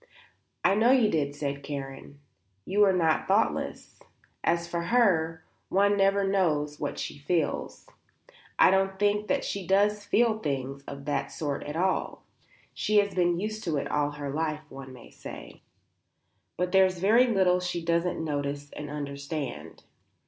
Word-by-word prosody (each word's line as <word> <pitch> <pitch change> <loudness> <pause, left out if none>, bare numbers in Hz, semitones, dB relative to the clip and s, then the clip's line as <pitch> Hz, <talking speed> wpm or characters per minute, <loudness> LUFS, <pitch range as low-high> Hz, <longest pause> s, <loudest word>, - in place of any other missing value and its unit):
"I - - +4
know 220 +4 +3
you 250 -5 +4
did," 145 -2 -1
said 140 -1 -3
Karen. 140 0 -7 0.4
"You 205 +2 +3
are 195 - +4
not 165 -4 +1
thoughtless. 205 +4 0 0.4
As 170 0 +1
for 170 0 -3
her, 165 -8 +2 0.2
one 200 +2 +3
never 195 0 +3
knows 150 -7 0
what 145 - -3
she - - -5
feels. 160 +1 -2 0.7
I - - +6
don't 190 0 +1
think 205 +1 +1
that - - 0
she 195 -3 -4
does 205 +2 +2
feel 225 0 +2
things 135 -4 -3
of 140 0 -8
that 140 -1 -2
sort 145 -3 -3
at 150 - -5
all; 185 +3 -1 0.5
she 215 - +1
has 205 -1 +3
been 175 -1 +1
used 215 +2 -4
to 160 -4 0
it - - -3
all 145 -1 +1
her 145 -1 -5
life, 155 0 -2
one 135 -1 -9
may 125 -2 -13
say; - - -10 1.0
but 180 0 -1
there's 190 -1 +4
very 220 +8 +4
little 190 -5 +3
she 175 -2 -3
doesn't 170 0 0
notice 145 -1 -3
and 150 -1 -7
understand. 140 - -6
170 Hz, 155 wpm, -28 LUFS, 145-195 Hz, 1.0 s, I